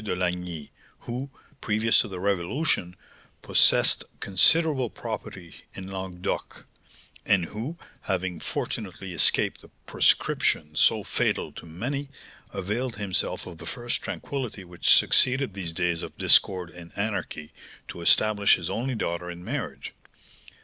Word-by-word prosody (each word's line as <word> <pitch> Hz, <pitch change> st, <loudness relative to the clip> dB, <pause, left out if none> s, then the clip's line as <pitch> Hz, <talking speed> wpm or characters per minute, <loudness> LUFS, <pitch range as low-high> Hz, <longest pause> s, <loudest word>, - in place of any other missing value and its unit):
de 105 Hz, -, -2 dB
Lagny, 90 Hz, -3 st, -3 dB, 0.3 s
who, 125 Hz, +4 st, -5 dB, 0.3 s
previous 110 Hz, +1 st, +2 dB
to -, -, -3 dB
the 95 Hz, -3 st, -7 dB
Revolution, 95 Hz, -, 0 dB, 0.5 s
possessed -, -, +5 dB, 0.2 s
considerable 135 Hz, -, +3 dB
property 100 Hz, -7 st, -7 dB, 0.2 s
in 95 Hz, -, -7 dB
Languedoc, 95 Hz, -2 st, -5 dB, 0.6 s
and 95 Hz, -4 st, +3 dB
who, 115 Hz, -, -6 dB, 0.2 s
having 95 Hz, -3 st, -2 dB
fortunately 95 Hz, -1 st, -4 dB
escaped 85 Hz, -, +3 dB
the -, -, -13 dB, 0.2 s
proscription 75 Hz, 0 st, +2 dB
so -, -, +3 dB
fatal -, -, -1 dB
to -, -, -11 dB
many, 135 Hz, -, -4 dB, 0.4 s
availed 110 Hz, +6 st, -3 dB
himself 100 Hz, -3 st, -2 dB
of 85 Hz, -3 st, -10 dB
the -, -, -9 dB
first 120 Hz, -1 st, -3 dB
tranquillity 125 Hz, -8 st, -5 dB
which 90 Hz, -1 st, +1 dB
succeeded 130 Hz, -3 st, +5 dB
these 95 Hz, -4 st, -4 dB
days 85 Hz, -1 st, 0 dB
of -, -, -8 dB
discord 90 Hz, -3 st, +4 dB
and 85 Hz, -1 st, -12 dB
anarchy 100 Hz, -7 st, -3 dB, 0.3 s
to 85 Hz, -, -8 dB
establish 105 Hz, +3 st, +5 dB
his 85 Hz, -2 st, -5 dB
only 125 Hz, +2 st, -2 dB
daughter 90 Hz, -4 st, -3 dB
in 90 Hz, 0 st, -8 dB
marriage. 130 Hz, +2 st, -5 dB
95 Hz, 130 wpm, -26 LUFS, 90-115 Hz, 0.6 s, possessed